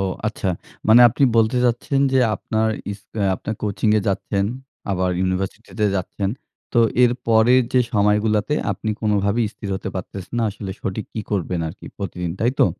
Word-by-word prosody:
ও - - +1 0.2
আচ্ছা। 105 -3 -2 0.4
মানে 115 +3 +8
আপনি 125 +4 +2
বলতে 115 +2 +3
চাচ্ছেন 125 +3 +1
যে 130 - +4 0.2
আপনার 110 +2 -1 0.2
ইস 100 - -10 0.3
আপনার 110 +4 -4
কোচিং-এ 105 +1 +2
যাচ্ছেন, 100 0 0 0.5
আবার 95 -1 +1
ইউনিভার্সিটি 95 +4 -2
তে 105 - +4
যাচ্ছেন। 95 +1 -2 0.4
তো 120 - +3 0.2
এর 120 -1 +5
পরের 115 +3 +5
যে 130 - +5
সময়গুলাতে 105 +5 +2 0.2
আপনি 110 - -3
কোনোভাবেই 105 +1 +1
স্থির 100 - -8
হতে - - -5
পারতেছেন 95 +3 -6
না। 115 - +1
আসলে 100 -1 -7
সঠিক 100 +3 -3
কী 110 - -2
করবেন 90 -3 -1
আরকি 90 - -11
প্রতিদিন, 90 -3 -4
তাই 120 - +3
তো? - - +7
105 Hz, 165 wpm, -21 LUFS, 95-115 Hz, 0.5 s, মানে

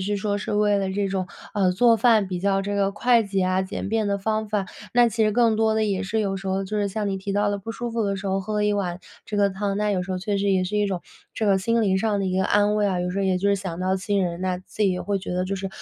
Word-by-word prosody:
是 205 0 0
说 205 0 -1
是 - - -4
为 205 -1 +3
了 195 -1 -1
这 200 0 -1
种， 190 -1 -2 0.3
呃， 190 -3 +2
做 230 +5 +4
饭 225 -4 +3
比 180 -1 -3
较 195 +1 +1
这 205 +1 -2
个 200 0 +1
快 235 +2 +3
捷 195 -1 -1
啊、 185 0 +1
简 190 +1 -4
便 220 0 0
的 200 0 0
方 215 +2 -1
法， 205 -2 -1 0.3
那 240 -1 +5
其 225 0 +1
实 215 - +2
更 230 -1 +3
多 220 0 +2
地 220 0 +1
也 195 0 -1
是 220 +3 -1
有 195 -2 -1
时 195 0 -7
候， 190 +1 0
就 210 +2 -3
是 205 - +1
像 205 +1 -2
你 195 - -1
提 195 +1 -4
到 205 +1 +1
了 205 0 -1
不 225 +3 -6
舒 240 +1 -4
服 230 -1 -1
的 200 -1 0
时 195 +1 -4
候 190 0 +1
喝 215 +3 -4
了 210 0 +1
一 210 - +2
碗 185 -3 -2 0.2
这 210 - -4
个 200 -1 +3
汤， 195 +1 -2
那 210 0 0
有 190 -3 0
时 190 - -4
候 185 - -2
确 200 +1 -1
实 200 +1 0
也 185 -1 +2
是 190 +3 -2
一 210 0 +2
种 185 -3 -3 0.3
这 220 - -2
个 195 -2 +3
心 230 +4 +1
灵 190 -2 +2
上 210 0 0
的 - - -1
一 185 0 0
个 190 - +2
安 205 +2 +3
慰 210 -1 +2
啊。 185 -3 0
有 180 0 -2
时 190 - -3
候 200 - +1
也 190 -1 +2
就 195 +2 0
是 200 - +3
想 185 -3 -5
到 185 +1 +1
亲 200 +1 0
人， 170 0 -4
那 185 -1 -1
自 205 +3 -3
己 195 - +3
也 180 - -3
会 200 -1 -1
觉 185 -1 -5
得 180 0 0
就 195 +1 -3
是 195 0 -4
200 Hz, 355 characters per minute, -24 LUFS, 190-210 Hz, 0.3 s, 那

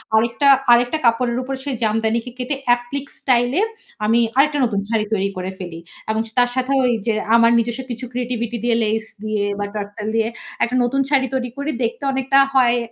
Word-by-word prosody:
আরেকটা, 235 +5 +2 0.2
আরেকটা 245 +5 +4
কাপড়ের 235 +1 +2
উপর 270 +1 -4
সেই 280 -3 -2
জামদানি 220 +1 +1
কে 250 - -7
কেটে 255 +3 -2 0.2
এপ্লিক 255 +3 -6
স্টাইল 245 -1 +2
এ - - +3 0.4
আমি 230 +2 +3 0.2
আরেকটা 295 +1 +3
নতুন 200 -3 -1
শাড়ি 220 -2 +1
তৈরি 200 -1 +1
করে 185 +1 -4
ফেলি। 175 -3 -7 0.3
এবং 220 0 +1 0.2
তার 245 0 +4
সাথেও 265 +1 +1
ওই 240 - +2
যে 225 - +3 0.2
আমার 230 0 +5
নিজস্ব 235 +2 -2
কিছু 240 +2 -5
ক্রিয়েটিভিটি 240 -1 -3
দিয়ে 240 -1 +2
লেস 220 +1 -1 0.2
দিয়ে 215 -1 -1 0.2
বা 205 - -1
টার্সাল 210 +1 -5
দিয়ে 225 0 +2 0.4
একটা 245 - 0
নতুন 270 +3 +1
শাড়ি 265 -2 +3
তৈরি 250 -1 -2
করি 285 +2 -2
দেখতে 235 +5 -3
অনেকটা 265 +1 +3
হয় 245 -2 +4
240 Hz, 190 wpm, -20 LUFS, 220-260 Hz, 0.4 s, আমার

